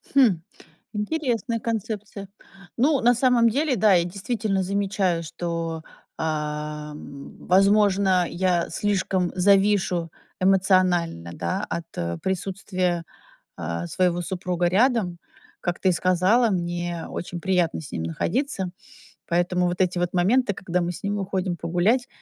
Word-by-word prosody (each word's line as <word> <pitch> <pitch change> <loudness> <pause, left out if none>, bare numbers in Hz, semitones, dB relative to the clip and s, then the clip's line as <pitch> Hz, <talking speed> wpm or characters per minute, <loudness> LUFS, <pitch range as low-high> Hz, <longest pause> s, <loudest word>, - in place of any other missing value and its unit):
Хм, 235 -11 +5 0.5
интересная 235 0 -1
концепция. 215 -3 -4 0.5
Ну, 275 +3 +3
на 240 +1 +5
самом 240 -1 +4
деле, 280 +3 +1
да, 210 -2 +4
я 170 -1 +4
действительно 195 +2 -2
замечаю, 190 -3 0
что, 165 -1 -4 0.3
э, - - -5 1.2
возможно, 195 -1 +3
я 175 -1 0
слишком 185 -1 0
завишу 190 -3 +3 0.3
эмоционально, 185 - +2
да, 190 - -2
от 170 -1 -4 0.3
присутствия, 185 -2 -2 0.6
э, 85 +2 -3
своего 175 - +1
супруга 180 -1 -2
рядом. 200 -3 +2 0.4
Как 175 -1 -3
ты 190 - +3
сказала, 185 +7 +3
мне 175 -2 -2
очень 175 0 -5
приятно 180 -3 +1
с 145 - -10
ним 80 -1 -3
находиться. 190 - -2 0.6
Поэтому 175 +1 +1
вот 175 +1 -3
эти 185 -1 +1
вот 175 0 -1
моменты, 205 +5 +3
когда 180 -2 -2
мы 175 +1 -1
с - - -9
ним 205 +1 -1
уходим 190 -2 -2
погулять, 180 +10 +1
185 Hz, 120 wpm, -24 LUFS, 175-205 Hz, 1.2 s, Хм